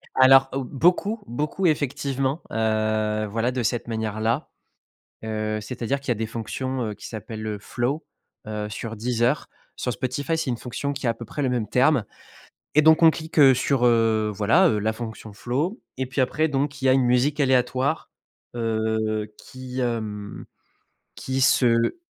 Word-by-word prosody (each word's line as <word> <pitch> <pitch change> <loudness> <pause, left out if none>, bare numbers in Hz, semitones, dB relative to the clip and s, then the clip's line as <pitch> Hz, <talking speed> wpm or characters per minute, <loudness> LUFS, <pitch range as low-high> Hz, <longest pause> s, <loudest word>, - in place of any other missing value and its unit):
Alors, 135 +1 +7
heu, 135 - -1
beaucoup, 180 - +1
beaucoup 150 +9 -2
effectivement, 140 0 -1
heu, 110 -1 0
voilà 115 +4 -1
de 125 -1 -2
cette 120 +2 -1
manière-là, 110 +3 -2 0.8
heu, 110 -1 -2
c'est-à-dire 125 +4 -3
qu'il 140 - -14
y - - +4
a - - -1
des 110 +1 -2
fonctions, 120 +4 -4
heu, - - -5
qui - - -10
s'appellent 110 -1 -7
heu, 105 -1 -3
flow, 130 +9 -2 0.4
heu, 105 -1 -4
sur 115 +1 -6
Deezer. 120 +4 0 0.3
Sur 125 - -2
Spotify, 130 +7 -2
c'est 155 -5 -1
une 120 - -1
fonction 135 +4 -4
qui 135 -2 -4
a - - +4
à 115 - -2
peu 115 - -9
près 145 - -5
le 130 - +1
même 120 -4 -1
terme. 130 -2 +3 0.7
Et 155 - +7
donc 160 +2 +5
on 160 - +8
clique 160 +1 -8
heu, 135 -2 +8
sur 125 0 +1
heu, 115 -2 +3
voilà 115 - +4
heu, 105 - +1
la 110 +1 0
fonction 110 -2 -7
flow. 145 - -2 0.2
Et 130 - -1
puis 130 +1 -1
après 155 +5 +1
donc, 140 -1 -2
il - - -2
y 130 - +5
a - - +6
une 130 - +3
musique 125 +5 +2
aléatoire, 130 +2 +1 0.5
heu, 110 -2 -1
qui, 130 0 -8
hem, 105 -4 -4 0.7
qui 130 0 -3
se 120 - +3
125 Hz, 175 wpm, -24 LUFS, 110-135 Hz, 0.8 s, on